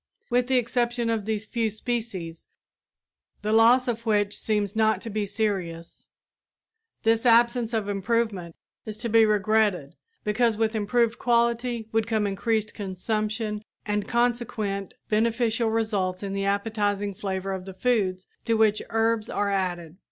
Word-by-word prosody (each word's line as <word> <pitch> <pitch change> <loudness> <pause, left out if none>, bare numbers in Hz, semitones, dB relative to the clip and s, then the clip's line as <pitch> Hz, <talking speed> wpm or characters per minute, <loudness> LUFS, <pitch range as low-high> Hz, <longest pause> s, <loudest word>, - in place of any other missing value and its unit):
With 245 0 +2
the 260 0 +3
exception 240 -1 0
of 220 -3 -1
these 220 0 -2
few 225 0 -1
species, 215 -7 -4 1.0
the 215 +1 0
loss 235 +3 +5
of 230 -1 -2
which 205 -2 +1
seems 210 -1 -1
not 220 0 +3
to 230 - -6
be 210 -1 -1
serious, 190 -6 -3 1.0
this 225 0 +3
absence 235 -1 +4
of 220 -3 -1
improvement 200 -4 -1 0.3
is 215 -1 -7
to 235 +1 -3
be 225 0 +5
regretted, 210 -7 +1 0.3
because 220 +1 +1
with 220 0 +1
improved 230 +2 +1
quality 235 -1 +1
would 225 0 +1
come 220 -2 +1
increased 210 +2 -1
consumption 215 +2 -3 0.2
and 210 -1 -1
consequent 230 -5 -1
beneficial 225 +1 +1
results 205 -4 -1
in 195 -1 -3
the 195 0 -1
appetizing 205 0 0
flavor 190 0 -3
of 190 -1 -4
the 190 - -8
foods 190 -6 0 0.2
to 230 - +2
which 215 -1 +3
herbs 225 -1 +1
are 205 0 0
added. 175 -3 -2
220 Hz, 145 wpm, -26 LUFS, 200-230 Hz, 1.0 s, loss